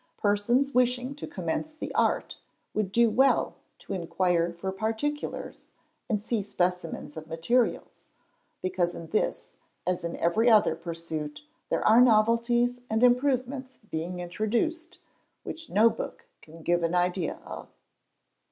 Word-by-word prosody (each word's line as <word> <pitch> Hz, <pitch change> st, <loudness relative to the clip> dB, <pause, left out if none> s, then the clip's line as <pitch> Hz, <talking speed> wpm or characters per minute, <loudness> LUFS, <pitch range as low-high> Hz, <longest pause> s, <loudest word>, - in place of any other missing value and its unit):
Persons 240 Hz, +7 st, +2 dB
wishing 250 Hz, +1 st, +2 dB
to 285 Hz, -, -7 dB
commence 185 Hz, -, -3 dB
the -, -, -6 dB
art -, -, +1 dB, 0.4 s
would 210 Hz, -3 st, -1 dB
do 235 Hz, +3 st, +5 dB
well 265 Hz, +5 st, +3 dB, 0.2 s
to -, -, -7 dB
inquire 175 Hz, -1 st, +1 dB
for 175 Hz, +3 st, -4 dB
particulars, 225 Hz, +9 st, -3 dB, 0.4 s
and 210 Hz, -3 st, 0 dB
see 230 Hz, -1 st, 0 dB
specimens 180 Hz, -5 st, -2 dB
of 155 Hz, 0 st, -7 dB
materials; 200 Hz, +10 st, 0 dB, 0.6 s
because 185 Hz, -1 st, 0 dB
in 165 Hz, -1 st, -8 dB
this, 215 Hz, -, -1 dB, 0.3 s
as 180 Hz, -1 st, -1 dB
in 170 Hz, -, -3 dB
every 220 Hz, +8 st, +3 dB
other 210 Hz, -7 st, +5 dB
pursuit, 165 Hz, -, -5 dB, 0.3 s
there -, -, +1 dB
are 225 Hz, +3 st, +7 dB
novelties 240 Hz, +1 st, +3 dB
and 220 Hz, +2 st, +1 dB
improvements 255 Hz, +1 st, +2 dB
being 170 Hz, +3 st, -3 dB
introduced, 240 Hz, -, -2 dB, 0.5 s
which 325 Hz, 0 st, -7 dB
no 215 Hz, +3 st, +5 dB
book 230 Hz, -, -4 dB, 0.2 s
can 165 Hz, +1 st, -14 dB
give 175 Hz, +1 st, +2 dB
an 165 Hz, +1 st, 0 dB
idea 180 Hz, -1 st, 0 dB
of. -, -, -8 dB
215 Hz, 135 wpm, -28 LUFS, 175-245 Hz, 0.6 s, are